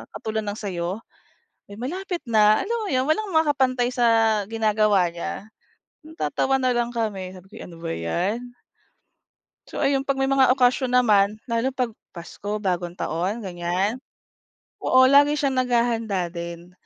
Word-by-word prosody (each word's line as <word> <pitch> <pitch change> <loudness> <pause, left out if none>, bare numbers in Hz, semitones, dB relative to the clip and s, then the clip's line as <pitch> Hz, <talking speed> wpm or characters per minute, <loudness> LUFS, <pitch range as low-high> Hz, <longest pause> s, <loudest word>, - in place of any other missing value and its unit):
katulad 220 -1 -3
ng 205 0 -3
sayo." 185 +1 -4 0.7
Malapit 345 - -4
na 215 -1 +4
alam 465 +4 -2
mo - - -4
yun 260 +2 +1
walang 400 +5 0
makaka-pantay 265 -6 +2
sa 225 -3 +3
ginagawa 215 -4 +2
niya, 170 +4 -6 0.6
matatawa 270 - -1
na 255 - +2
lang 240 0 -1
kami 195 -5 -3
sabi 185 +1 -14
ko, - - -24
"Ano 165 -1 -13
ba - - -4
'yan." 195 - -3 1.2
So - - -6
ayun 275 -1 +1
pag 275 -1 -1
may 270 - +1
mga 265 -2 +4
okasyon 255 0 +2
naman, 215 -4 +3
lalo 235 +3 0
pag 250 -2 -1 0.2
Pasko, 205 +5 -6
bagong 175 -3 -2
taon 185 +8 -2
ganyan. 185 +3 -2 0.9
Oo 260 0 +6
lagi 285 +2 +5
siyang 270 -2 0
nag-hahanda 230 -6 0
din 170 +1 -8
225 Hz, 140 wpm, -23 LUFS, 190-260 Hz, 1.2 s, Oo